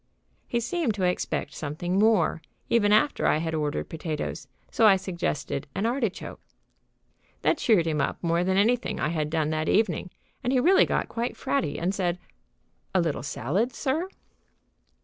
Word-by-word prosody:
He 235 Hz, -, 0 dB
seemed 255 Hz, -, -1 dB
to 195 Hz, -, -2 dB
expect 180 Hz, 0 st, -1 dB
something 175 Hz, +5 st, -2 dB
more, 210 Hz, -7 st, +3 dB, 0.3 s
even 205 Hz, -3 st, +4 dB
after 215 Hz, +8 st, +3 dB
I -, -, +3 dB
had 160 Hz, +1 st, -2 dB
ordered 150 Hz, -1 st, -1 dB
potatoes, 155 Hz, -4 st, -4 dB, 0.2 s
so 225 Hz, -, +5 dB
I 200 Hz, -, +7 dB
suggested 170 Hz, -6 st, -3 dB
an 195 Hz, +4 st, -1 dB
artichoke. 235 Hz, -4 st, -2 dB, 1.0 s
That 320 Hz, -, +2 dB
cheered 205 Hz, -8 st, +3 dB
him 155 Hz, -3 st, 0 dB
up -, -, -1 dB
more 170 Hz, +1 st, +2 dB
than 190 Hz, +1 st, +1 dB
anything 235 Hz, +4 st, +1 dB
I 150 Hz, -, 0 dB
had 155 Hz, -2 st, -1 dB
done 155 Hz, -1 st, 0 dB
that 155 Hz, 0 st, -1 dB
evening, 215 Hz, -3 st, +1 dB, 0.3 s
and 250 Hz, -, 0 dB
he 260 Hz, -, +3 dB
really 370 Hz, +9 st, +5 dB
got -, -, 0 dB
quite 235 Hz, +1 st, -3 dB
fratty 280 Hz, -2 st, -1 dB
and 180 Hz, +3 st, 0 dB
said: 180 Hz, -3 st, -1 dB, 0.8 s
"A -, -, +5 dB
little 165 Hz, -4 st, 0 dB
salad, 185 Hz, -, -1 dB
sir?" 305 Hz, +9 st, -1 dB
185 Hz, 165 wpm, -26 LUFS, 160-230 Hz, 1.0 s, I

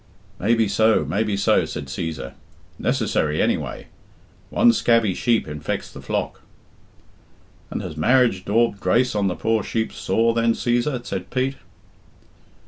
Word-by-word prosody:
"Maybe 115 Hz, +2 st, +2 dB
so, 110 Hz, +2 st, +3 dB
maybe 105 Hz, 0 st, -1 dB
no," -, -, +4 dB
said 75 Hz, -, -6 dB
Cæsar. 80 Hz, -2 st, -5 dB, 0.5 s
"Necessary 75 Hz, 0 st, 0 dB
anyway; -, -, -1 dB, 0.6 s
one 235 Hz, +2 st, +4 dB
scabby 115 Hz, -, +2 dB
sheep 115 Hz, 0 st, +1 dB
infects 75 Hz, 0 st, -4 dB
the -, -, -9 dB
flock." -, -, -3 dB, 1.3 s
"And -, -, -4 dB
has -, -, -6 dB
marriage 125 Hz, -8 st, +3 dB
daubed 110 Hz, 0 st, +1 dB
grace 125 Hz, +4 st, +2 dB
on 100 Hz, -2 st, +1 dB
the 90 Hz, -, -1 dB
poor 110 Hz, -1 st, 0 dB
sheep's 110 Hz, +2 st, -3 dB
sore 115 Hz, +1 st, +1 dB
then, 115 Hz, 0 st, +2 dB
Cæsar?" 120 Hz, +2 st, -1 dB
said -, -, -5 dB
Pete. 130 Hz, +1 st, -1 dB
115 Hz, 135 wpm, -22 LUFS, 100-120 Hz, 1.3 s, no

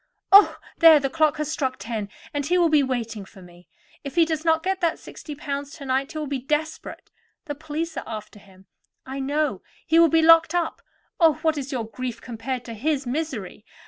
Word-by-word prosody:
Oh, 400 Hz, +1 st, +7 dB, 0.2 s
there, 325 Hz, -2 st, +8 dB
the 275 Hz, -1 st, -2 dB
clock 315 Hz, -1 st, +2 dB
has 305 Hz, 0 st, -3 dB
struck 270 Hz, -5 st, -1 dB
ten, 210 Hz, 0 st, -5 dB, 0.2 s
and 290 Hz, -1 st, -1 dB
he 355 Hz, +3 st, +2 dB
will 345 Hz, -2 st, +4 dB
be 305 Hz, -2 st, +4 dB
waiting 230 Hz, -5 st, -3 dB
for 190 Hz, -, -16 dB
me. 175 Hz, 0 st, -17 dB, 0.4 s
If 280 Hz, +1 st, -7 dB
he 335 Hz, -1 st, +5 dB
does 315 Hz, -1 st, -3 dB
not 325 Hz, -1 st, +2 dB
get 380 Hz, 0 st, -1 dB
that 335 Hz, -2 st, +1 dB
sixty 300 Hz, -, -10 dB
pounds 285 Hz, 0 st, -5 dB
to 280 Hz, -, -9 dB
night 265 Hz, +1 st, -1 dB
he -, -, -6 dB
will 305 Hz, -, -3 dB
be 280 Hz, -1 st, -3 dB
desperate. 300 Hz, +4 st, -4 dB, 0.3 s
The 295 Hz, -, -4 dB
police 315 Hz, +2 st, -5 dB
are -, -, -4 dB
after 215 Hz, -1 st, -8 dB
him, 190 Hz, -1 st, -20 dB, 0.4 s
I 265 Hz, +1 st, -6 dB
know; 280 Hz, -5 st, -1 dB, 0.2 s
he 325 Hz, +1 st, +4 dB
will 335 Hz, -1 st, +6 dB
be 325 Hz, +1 st, +3 dB
locked 330 Hz, 0 st, +6 dB
up. 345 Hz, -2 st, -1 dB, 0.4 s
Oh! 325 Hz, -3 st, +6 dB
what 320 Hz, -1 st, +2 dB
is 280 Hz, -1 st, -5 dB
your 245 Hz, -4 st, -2 dB
grief 250 Hz, +2 st, -6 dB
compared 245 Hz, +1 st, -5 dB
to 230 Hz, -, -7 dB
his 275 Hz, +5 st, -1 dB
misery? 245 Hz, -, -4 dB
285 Hz, 210 wpm, -24 LUFS, 250-320 Hz, 0.4 s, there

